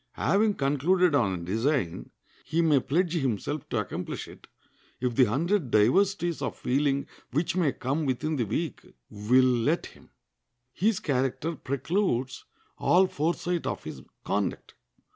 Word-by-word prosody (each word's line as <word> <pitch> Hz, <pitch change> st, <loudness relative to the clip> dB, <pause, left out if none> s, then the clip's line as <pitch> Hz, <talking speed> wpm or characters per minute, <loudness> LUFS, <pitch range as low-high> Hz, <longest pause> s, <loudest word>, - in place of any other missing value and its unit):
Having 210 Hz, +1 st, +2 dB
concluded 155 Hz, +6 st, +2 dB
on 100 Hz, -9 st, +3 dB
a 85 Hz, -2 st, -5 dB
design, 110 Hz, -, -1 dB, 0.3 s
he 165 Hz, +2 st, 0 dB
may 150 Hz, -4 st, +4 dB
pledge 165 Hz, +6 st, 0 dB
himself 135 Hz, -, -2 dB
to -, -, -1 dB
accomplish -, -, -4 dB
it, -, -, -14 dB, 0.5 s
if 125 Hz, -1 st, -1 dB
the 130 Hz, +2 st, +5 dB
hundred 155 Hz, -, 0 dB
diversities 170 Hz, -, +2 dB
of -, -, -3 dB
feeling 140 Hz, +1 st, 0 dB, 0.2 s
which 160 Hz, +4 st, -1 dB
may 170 Hz, -6 st, +2 dB
come 140 Hz, +5 st, -2 dB
within 150 Hz, +5 st, -1 dB
the 120 Hz, -, 0 dB
week 155 Hz, -, -3 dB, 0.3 s
will 115 Hz, +5 st, +3 dB
let 130 Hz, +6 st, +1 dB
him. -, -, -15 dB, 0.6 s
His 210 Hz, 0 st, +1 dB
character 135 Hz, +4 st, -1 dB
precludes 135 Hz, -, -1 dB, 0.3 s
all 185 Hz, +2 st, +4 dB
foresight 170 Hz, +1 st, -1 dB
of -, -, -3 dB
his -, -, -8 dB, 0.2 s
conduct. -, -, -2 dB
145 Hz, 140 wpm, -27 LUFS, 125-170 Hz, 0.6 s, the